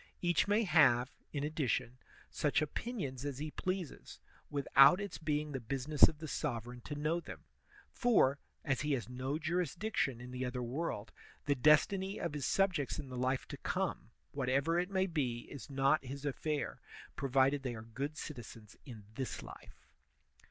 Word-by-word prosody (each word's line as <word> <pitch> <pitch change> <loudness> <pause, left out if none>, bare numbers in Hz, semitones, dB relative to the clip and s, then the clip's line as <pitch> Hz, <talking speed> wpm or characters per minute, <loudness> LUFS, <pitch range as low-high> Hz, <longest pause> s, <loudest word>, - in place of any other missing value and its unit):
Each 175 0 +2
may 210 +3 +3
have, 145 - +5 0.2
in 145 -1 -2
ad 155 +1 -5
dition, 125 -4 0 0.3
such 145 - +1
opinions 150 - -3
as 145 -3 -3
he 150 +2 -4
pleases, 185 -2 -4 0.3
without 140 +3 +6
its 200 -8 -5
being 150 -1 -1
the 135 - -3
business 140 +5 +4
of 160 - -5
the 155 +1 -7
sovereign 120 -5 -3
to 145 - -4
know 155 +4 0
them; - - -10 0.5
for, 145 - +3 0.3
as 135 -2 +1
he 150 0 0
has 125 -4 -2
no 130 +3 -3
jurisdiction 170 - -1
in 125 +1 -9
the 125 0 -3
other 125 0 -2
world, 120 -3 -3 0.3
the 145 - +3
destiny 185 - +3
of 170 -4 -2
his 145 -3 -2
subjects 185 -8 +1
in 140 -3 -6
the 130 - -6
life 130 +1 0
to - - -6
come, - - -2 0.2
whatever 140 +5 +1
it 180 +1 -1
may 190 -1 +2
be, 135 -10 -1
is 140 - -8
not 135 +2 +2
his 135 +2 -7
affair, 145 +1 -2 0.3
provided 135 +1 +2
they 125 -3 -3
are 110 - -8
good 140 +7 -5
citizens 115 -6 -8
in 115 -5 -9
this 130 +2 -4
life. - - -13
145 Hz, 170 wpm, -34 LUFS, 130-160 Hz, 0.5 s, without